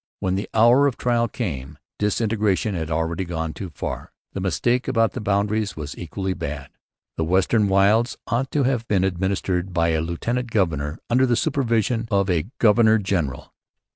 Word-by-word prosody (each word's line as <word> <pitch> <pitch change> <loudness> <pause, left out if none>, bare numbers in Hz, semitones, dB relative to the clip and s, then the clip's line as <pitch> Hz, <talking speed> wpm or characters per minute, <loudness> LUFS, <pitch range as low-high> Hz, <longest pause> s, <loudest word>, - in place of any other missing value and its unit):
When 95 - -1
the 100 +2 -3
hour 120 +5 +6
of 135 - -2
trial 120 -1 +1
came 75 - -5 0.2
disintegration 105 -1 0
had 80 -3 -3
already 80 +2 -1
gone 80 -2 -4
too 95 +4 -6
far. - - -6 0.2
The - - -4
mistake 120 - 0
about 115 -4 +2
the - - -6
boundaries 105 +1 0
was 75 -1 -6
equally 95 +2 -4
bad. 70 -4 -6 0.5
The 80 - 0
western 95 +5 +2
wilds 100 +5 +3
ought 130 +3 -1
to 145 - +2
have 125 -3 0
been 95 -3 +2
administered 95 0 -1
by 85 -1 +2
a 80 -1 +1
lieutenant 115 +10 -2
governor 80 -8 0
under 130 +2 +4
the 120 - +2
supervision 115 - 0
of 100 -3 +1
a 85 0 0
governor 110 0 +5
general. 90 -10 -2
100 Hz, 170 wpm, -23 LUFS, 85-115 Hz, 0.5 s, hour